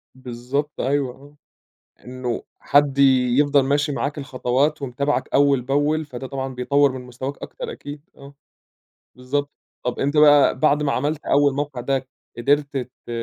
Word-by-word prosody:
بالضبط، 130 +3 -4
أيوه، 135 -2 0
آه، 145 +2 -18 0.7
إنه 125 -1 -4 0.2
حد 145 -1 +2 0.4
يفْضل 145 -1 +4
ماشي 145 +2 +1
معاك 145 +1 -3
الخطوات 140 +2 -1
ومتابعك 140 +2 -2
أوّل 140 -2 +4
بأوّل، 145 +4 0
فده 130 -1 -7
طبعًا 135 -1 -5
بيطور 140 +2 +2
من 130 0 -7
مستواك 125 +3 -6
أكتر - - -7
أكيد، 145 - -9 0.2
آه. 140 0 -13 0.8
بالضبط، 145 +3 -2 0.3
طَب 125 - -3
أنت 145 +2 0
بقى 145 -3 +6
بعد 150 +1 +3
ما 140 - +1
عملت 145 +4 -2
أوّل 140 0 +3
موقع 145 -3 -3
ده 135 0 -1 0.3
قدرت 140 +3 +1
ت 125 -1 -8
140 Hz, 145 wpm, -22 LUFS, 130-145 Hz, 0.8 s, بقى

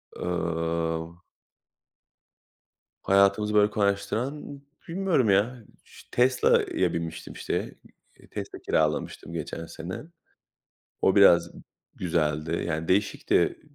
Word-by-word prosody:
eee 85 -1 -2 1.9
Hayatımızı 100 +2 +3
böyle 105 0 +5
kolaylaştıran 120 +8 -2 0.3
bilmiyorum 170 - +1
ya, 110 +5 +2 0.2
iş - - -16
Tesla'ya 125 +1 +2
binmiştim 85 -1 -5
işte. - - -3 0.4
İii, - - -18
Tesla - - -6
kiralamıştım, 80 +1 -1
geçen 85 0 -5
sene. 85 - -7 1.0
O 95 - +3
biraz 85 -4 +6 0.4
güzeldi; 80 -2 -1
yani 80 0 -2
değişikti. 100 +2 +1
95 Hz, 85 wpm, -26 LUFS, 80-105 Hz, 1.9 s, biraz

